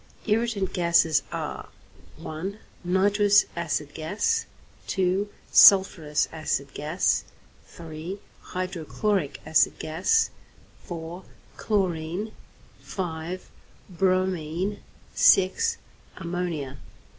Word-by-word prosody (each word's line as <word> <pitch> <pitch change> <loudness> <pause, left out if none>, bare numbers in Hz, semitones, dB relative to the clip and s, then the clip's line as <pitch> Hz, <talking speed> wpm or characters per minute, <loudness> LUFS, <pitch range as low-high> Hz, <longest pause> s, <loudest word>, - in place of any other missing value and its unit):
=Irritant 215 -3 0
Gases= 170 -3 +3
are - - -5 0.5
(1) 180 +6 -6 0.3
Nitrous 205 +3 +4
acid 155 -3 -2
gas; 205 - -1 0.4
(2) 190 +2 0 0.2
sulphurous 175 -6 +6
acid 145 -3 -3
gas; 155 +5 0 0.4
(3) 165 +3 -7 0.2
hydrochloric 185 -2 -2
acid 155 0 +3
gas; 180 - +1 0.5
(4) 170 +1 -7 0.3
chlorine; 185 0 -1 0.5
(5) 175 0 -5 0.4
bromine; 185 0 0 0.3
(6) 195 - +4 0.4
ammonia. 170 -5 -4
180 Hz, 75 wpm, -26 LUFS, 160-195 Hz, 0.5 s, sulphurous